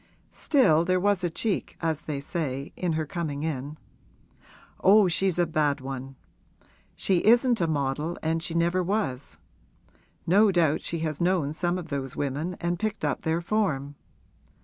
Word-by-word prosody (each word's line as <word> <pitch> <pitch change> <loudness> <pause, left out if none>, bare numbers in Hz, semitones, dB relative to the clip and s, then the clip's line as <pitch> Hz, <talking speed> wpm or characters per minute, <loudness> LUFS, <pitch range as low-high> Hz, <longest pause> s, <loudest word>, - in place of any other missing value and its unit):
Still, 245 - +3
there 185 +1 +1
was 200 -1 +1
a 175 - +1
cheek, 205 +5 -2
as 160 -2 -1
they 145 -3 -4
say, 140 -2 -4
in 175 -3 -1
her 155 0 -1
coming 155 -5 -4
in. 150 -1 -4 1.1
Oh, 200 +1 +6
she's 180 +1 +1
a 175 - +3
bad 150 -3 0
one! 135 0 -7 0.8
She 185 -3 +1
isn't 240 0 +4
a 170 - +2
model 150 +2 -1
and 160 +1 0
she 170 0 -4
never 170 +2 +2
was; 180 -9 -2 0.9
no 200 +4 +5
doubt 165 -4 +2
she 165 -1 -3
has 155 0 -3
known 170 -5 +1
some 175 +2 -1
of 175 -3 -7
those 135 -3 -4
women 145 +6 -2
and 175 0 -2
picked 215 -5 -2
up 145 - -1
their 160 +1 0
form. 170 -8 -1
165 Hz, 160 wpm, -26 LUFS, 145-185 Hz, 1.1 s, Oh